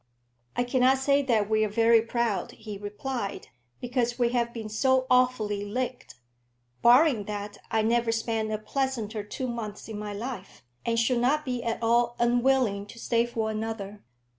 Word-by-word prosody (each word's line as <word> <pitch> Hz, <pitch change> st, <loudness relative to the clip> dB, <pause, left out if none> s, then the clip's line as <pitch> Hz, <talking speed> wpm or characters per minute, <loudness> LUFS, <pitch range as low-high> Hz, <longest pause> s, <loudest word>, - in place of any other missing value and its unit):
"I 245 Hz, -, +1 dB
cannot 255 Hz, +1 st, +3 dB
say 280 Hz, +1 st, +3 dB
that 230 Hz, -7 st, +1 dB
we 215 Hz, 0 st, +2 dB
are 215 Hz, -, 0 dB
very 230 Hz, +2 st, +4 dB
proud," 230 Hz, -2 st, -1 dB
he 215 Hz, -1 st, -8 dB
replied, 205 Hz, +2 st, -5 dB, 0.3 s
"because 245 Hz, -1 st, -1 dB
we 240 Hz, -2 st, +2 dB
have 235 Hz, -1 st, 0 dB
been 225 Hz, -2 st, -6 dB
so 260 Hz, +4 st, +2 dB
awfully 250 Hz, -5 st, +2 dB
licked. 250 Hz, +4 st, -4 dB, 0.7 s
Barring 245 Hz, -3 st, +5 dB
that, 205 Hz, 0 st, -6 dB
I 220 Hz, -, +1 dB
never 230 Hz, +1 st, +2 dB
spent 225 Hz, -1 st, -1 dB
a 215 Hz, -, 0 dB
pleasanter 225 Hz, -2 st, -2 dB
two 230 Hz, +5 st, -5 dB
months 225 Hz, -4 st, -5 dB
in 215 Hz, -2 st, -6 dB
my 210 Hz, -1 st, -5 dB
life, 220 Hz, -, -7 dB, 0.2 s
and 230 Hz, 0 st, +1 dB
should 235 Hz, +1 st, +2 dB
not 295 Hz, +5 st, +2 dB
be 250 Hz, -2 st, -2 dB
at 230 Hz, 0 st, -3 dB
all 235 Hz, +1 st, +2 dB
unwilling 240 Hz, -4 st, +2 dB
to 230 Hz, -, -12 dB
stay 235 Hz, 0 st, +1 dB
for 225 Hz, -2 st, -2 dB
another. 215 Hz, -2 st, -5 dB
230 Hz, 165 wpm, -27 LUFS, 215-250 Hz, 0.7 s, Barring